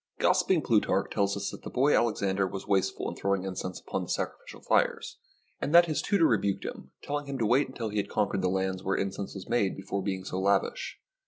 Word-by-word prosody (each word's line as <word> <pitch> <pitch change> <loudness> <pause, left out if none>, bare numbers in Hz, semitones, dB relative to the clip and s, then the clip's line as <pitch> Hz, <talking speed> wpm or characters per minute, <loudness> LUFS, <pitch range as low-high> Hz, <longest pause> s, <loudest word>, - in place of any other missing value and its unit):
Gossiping - - +3
Plutarch - - +2
tells 100 0 +1
us 100 - -3
that - - -9
the - - -7
boy 140 +4 +3
Alex 115 -3 +1
ander 95 0 +1
was 95 +1 -6
wasteful 95 -1 0
in - - -4
throwing 100 -1 0
incense 90 -1 -4
upon - - -3
the - - -7
sacrificial - - -4
fires, - - +1 0.4
and 150 - 0
that 175 0 +9
his 155 -3 -1
tutor 200 -5 +3
rebuked 100 -7 +1
him, - - -7
tell 145 +1 -1
ing 145 - -12
him 140 -1 -3
to 115 - 0
wait 130 +6 +3
until 120 -4 -5
he 105 - -4
had 100 - -1
conquered 100 -2 0
the 90 - +1
lands 95 0 -1
where 95 - 0
incense 100 0 -3
was 95 - -8
made 110 -5 +1
before 95 +1 -3
being 95 -1 -3
so 95 - -4
lavish. 100 +1 0
100 Hz, 230 wpm, -29 LUFS, 95-120 Hz, 0.4 s, that